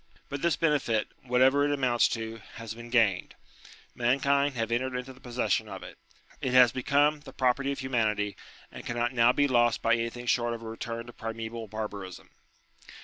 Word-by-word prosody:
But 140 0 -4
this 170 -1 +2
benefit, 140 -9 +1 0.2
whatever 130 +3 +4
it 145 - +1
amounts 125 -4 +3
to, 115 -1 -4 0.2
has 115 -2 -6
been 120 +1 -10
gained. 110 -7 +2 0.6
Mankind 140 +3 +2
have 115 -1 -2
entered 130 +2 -1
into 125 +1 -5
the 130 - -18
possession 125 0 -1
of - - -7
it. - - -11 0.4
It 130 - -1
has 125 -2 +8
become 145 +4 +2
the 150 - -12
property 135 +2 +1
of 140 - -3
.humanity, 110 -6 0 0.4
and - - -9
cannot 120 +1 -1
now 120 0 +5
be 145 +2 +2
lost 120 -3 +2
by 115 - +4
anything 115 +1 -2
short 120 -1 +1
of 115 - -10
a - - -7
return 115 +1 -5
to 120 - -11
primseval 115 0 -6
barbarism. 100 -3 -7
120 Hz, 180 wpm, -28 LUFS, 115-130 Hz, 0.6 s, has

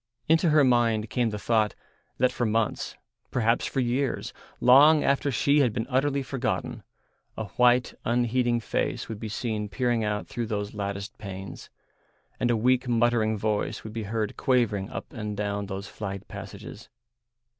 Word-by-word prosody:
Into 165 +2 +4
her 150 -1 +5
mind 115 -4 +2
came 120 -3 +1
the 105 - -4
thought 110 0 +1 0.4
that 125 +1 +3
for 125 - -3
months, 110 -1 0 0.3
perhaps 115 -1 +1
for 135 - -1
years, 125 +2 -1 0.3
long 145 +5 +7
after 140 +1 +2
she 140 +4 +3
had 125 -6 +3
been 115 -1 -2
utterly 140 +2 +1
forgotten, 130 -2 -3 0.6
a 110 -2 -4
white, 125 0 +3
unheeding 120 0 +1
face - - -2
would 110 -2 -6
be 110 - -5
seen 105 -1 -3
peering 120 -1 0
out 105 0 -2
through 120 -2 -4
those 105 -1 -3
latticed 100 -1 -4
panes, 95 -3 -8 0.7
and 120 - +1
a 120 - +3
weak 125 +3 +2
muttering 115 -2 +2
voice 105 0 -1
would 110 - -8
be 115 -2 -4
heard 110 -2 -2
quavering 115 -7 +1
up - - -7
and 105 -2 -5
down 100 -1 -2
those 95 0 -5
flagged 100 -2 -6
passages. 105 +1 -9
115 Hz, 160 wpm, -27 LUFS, 105-125 Hz, 0.7 s, long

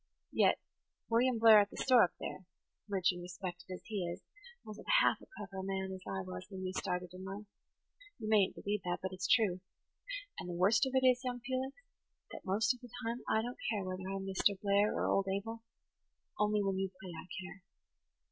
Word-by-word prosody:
Yet - - +4 0.5
William 240 +1 +4
Blair 220 -1 +9
at 205 0 +2
the - - -11
store 255 -3 +6
up 175 - +1
there, 185 - -6 0.4
rich 190 -3 +2
and 175 0 -7
respected 180 0 -7
as 185 - -6
he 205 -4 -2
is, 175 - -8 0.4
wasn't 215 -1 -9
half - - +4
as - - -14
clever 195 -2 -7
a - - -3
man 190 0 -2
as 190 - -7
I 95 -1 -2
was 90 0 -7
when 190 -1 -6
we 185 - -2
started 180 -1 -2
in 185 +1 -8
life: 195 +2 -6 0.7
you 220 - -5
mayn't 210 -3 +4
believe 205 0 -2
that, 175 -1 -1
but 190 0 -3
it's 185 -1 -2
true. 200 -6 +3 0.8
And 180 - -5
the 175 - -3
worst 210 +8 +4
of 265 - -4
it 260 0 +4
is, 250 0 +5
young 245 -1 -3
Felix, 260 +2 -3 0.5
that - - -7
most 205 +6 +2
of 250 - -13
the 245 - -11 0.2
time 235 +2 -1
I 220 - +3
don't 245 +1 -5
care 210 -4 0
whether 185 0 -4
I'm 195 0 -3
Mr. 195 +1 +2
Blair 200 +1 +3
or - - 0
old 195 0 +2
Abel. 225 +4 -3 0.8
Only 210 0 +3
when 195 -1 0
you 195 0 0
play 190 -2 -8
I 160 - -8
care. 190 0 -8
195 Hz, 210 wpm, -34 LUFS, 185-225 Hz, 0.8 s, Blair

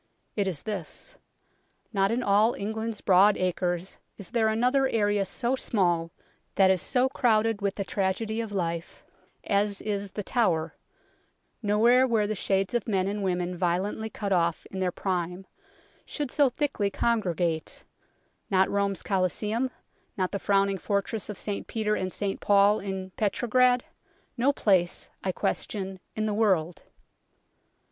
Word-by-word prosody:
It 205 -2 0
is 175 -6 -3
this. 210 - -6 0.8
Not 195 -1 +2
in 240 +3 0
all 210 +3 +3
England's 220 +1 -4
broad 195 +2 +5
acres 180 0 -2 0.2
is 200 -4 -8
there 230 -2 +2
another 250 +5 +2
area 205 -4 +1
so 240 +6 -1
small 175 -9 0 0.5
that 190 -1 +5
is 185 -3 +1
so 255 0 +2
crowded 225 -4 +1
with 200 -1 -1
the 200 - -2
tragedy 210 +4 -1
of 225 -2 -6
life 170 -3 -3 0.4
as 200 0 +1
is 200 -2 -3
The 210 - -4
Tower, 170 -9 0 0.9
nowhere 235 +5 +4
where 225 -4 +2
the 210 - -1
shades 195 0 0
of 240 -2 -1
men 190 -3 +1
and 205 +1 -2
women 180 -1 -1
violently 185 +5 -1
cut 205 -2 -4
off 170 -3 +1
in 190 - -5
their 185 -1 0
prime 180 0 -3 0.6
should 290 -4 -4
so 285 -3 +4
thickly 250 -6 -1
congre 215 -4 0
gate 165 -2 -2 0.7
not 190 -1 +3
Rome's 200 -1 0
Coliseum, 210 +6 0 0.5
not 185 -1 0
the 200 - -2
frowning 195 0 +2
Fortress 200 +2 -2
of 210 - -5
St 205 -1 -4
Peter 215 -2 -1
and 185 -3 -2
St 200 0 -2
Paul 205 +1 +4
in 190 -1 -5
Petrograd, 245 +4 +2 0.5
no 260 +3 +3
place, 185 -9 +1
I 190 - 0
question, 190 0 -2 0.2
in 215 - -1
the 215 - 0
world. 185 -6 +1
200 Hz, 150 wpm, -27 LUFS, 185-220 Hz, 0.9 s, broad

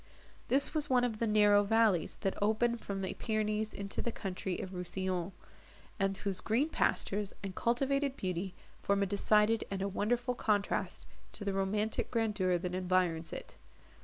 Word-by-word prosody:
This 275 +4 +4
was 300 -2 0
one 250 -2 +4
of 225 -3 -1
the 230 - +1
narrow 210 -1 +5
valleys, 210 -5 +2
that 195 -2 0
open 220 +3 +2
from 200 -4 -5
the 190 - -2
Pyrenees 215 -1 -1
into 200 0 -4
the 235 - -2
country 190 -3 -4
of 190 - -5
Rousillon, 185 0 -2 0.7
and 195 0 +1
whose 195 -2 -2
green 250 +8 +1
pastures, 205 -9 0
and 195 -1 -4
cultivated 275 +5 0
beauty, 185 0 -3 0.3
form 200 0 +2
a - - +2
decided 210 +3 +3
and 195 0 -2
wonderful 245 +5 0
contrast 210 -4 -1 0.3
to 205 - -5
the 200 - 0
romantic 210 +3 -1
grandeur 210 -6 +1
that 180 +1 -4
environs 180 -3 +1
it. - - -8
205 Hz, 160 wpm, -33 LUFS, 190-225 Hz, 0.7 s, narrow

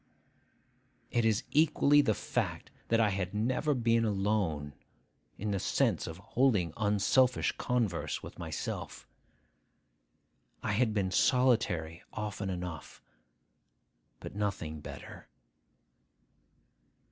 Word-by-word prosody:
It 120 -1 +2
is 110 -1 +2
equally 145 -1 +5
the 110 -7 +1
fact - - -3 0.2
that 115 - +2
I 110 -2 +4
had 95 0 -3
never 130 +7 +1
been 115 -1 +2
alone, 95 -9 0 0.6
in 105 +1 -3
the 100 - 0
sense - - +1
of 80 - -6
holding 105 - +1
unselfish 110 +4 +2
converse 115 -9 -1
with - - -10
myself. - - -5 1.6
I - - 0
had 110 +1 +1
been 95 -3 0
solitary 95 -10 +2
often 105 -2 -4
enough, 90 -4 -6 1.2
but - - -8
nothing 95 -7 -3
better. - - -10
105 Hz, 100 wpm, -31 LUFS, 90-120 Hz, 1.6 s, equally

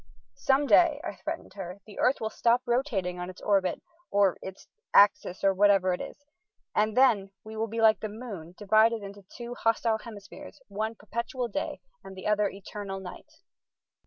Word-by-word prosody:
"Some 275 +2 +2
day," 315 -1 +5
I - - -4
threatened 320 - -6
her, 190 -1 -7
"the 210 - -12
earth 255 +2 +3
will 220 0 -3
stop 240 +2 +2
rotating 225 -8 -1
on 180 0 -5
its 185 - -11
orbit, 195 -3 +1 0.3
or 200 -2 +3
its 190 0 -9 0.3
axis, 200 -2 +4
or 195 0 +4
whatever 195 -1 +4
it 180 - -4
is, 285 - -9 0.5
and 215 +2 +1
then 215 -7 +4
we 220 0 -9
will 220 +1 -1
be 225 +1 -3
like 220 -2 +5
the 215 - -4
moon, 205 -7 -8
divided 220 +1 +3
into 200 0 -9 0.2
two 240 0 -6
hostile 225 -1 +1
hemispheres, 230 +7 -11
one 215 +3 -3
perpetual 235 +3 -4
day 290 - -4 0.2
and 190 - -10
the 185 - -9
other 210 -1 +2
eternal 195 0 -7
night." 185 -2 -10
210 Hz, 175 wpm, -28 LUFS, 195-235 Hz, 0.5 s, day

